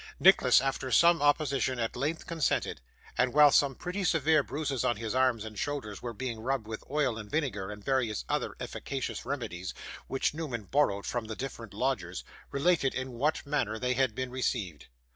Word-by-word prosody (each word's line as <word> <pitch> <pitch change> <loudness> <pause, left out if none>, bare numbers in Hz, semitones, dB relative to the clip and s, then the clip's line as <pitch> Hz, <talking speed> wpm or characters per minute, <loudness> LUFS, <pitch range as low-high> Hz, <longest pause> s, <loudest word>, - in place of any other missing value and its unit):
Nicholas, - - +7
after 135 -1 -2
some 170 +2 +5
opposition, 145 -3 +2
at 115 -1 -2
length 150 +6 -2
consented, 165 - -1 0.4
and, 125 0 +3
while 150 -1 +8
some 140 -1 +4
pretty 180 +7 -4
severe 160 -3 +3
bruises 140 -3 -2
on 120 - +1
his 110 0 -3
arms 130 -4 +2
and 110 -2 -7
shoulders 130 -9 -3
were 120 - -4
being 115 0 -4
rubbed 125 0 -1
with 110 0 -6
oil 135 -5 0
and 105 -1 -8
vinegar, 105 -11 -1
and 105 -1 -9
various 120 - 0
other - - -1
efficacious - - -4
remedies 90 +1 -4 0.3
which 135 - 0
Newman 145 -8 -4
borrowed 100 -4 +1
from 120 -2 -2
the 110 0 -5
different 120 -4 -6
lodgers, 100 -6 -2 0.3
related 140 -1 +2
in 130 0 -3
what 145 +7 0
manner 140 -7 -1
they 125 +2 0
had 130 -3 +1
been 130 -1 -3
received. 110 - -2
130 Hz, 180 wpm, -30 LUFS, 110-145 Hz, 0.4 s, while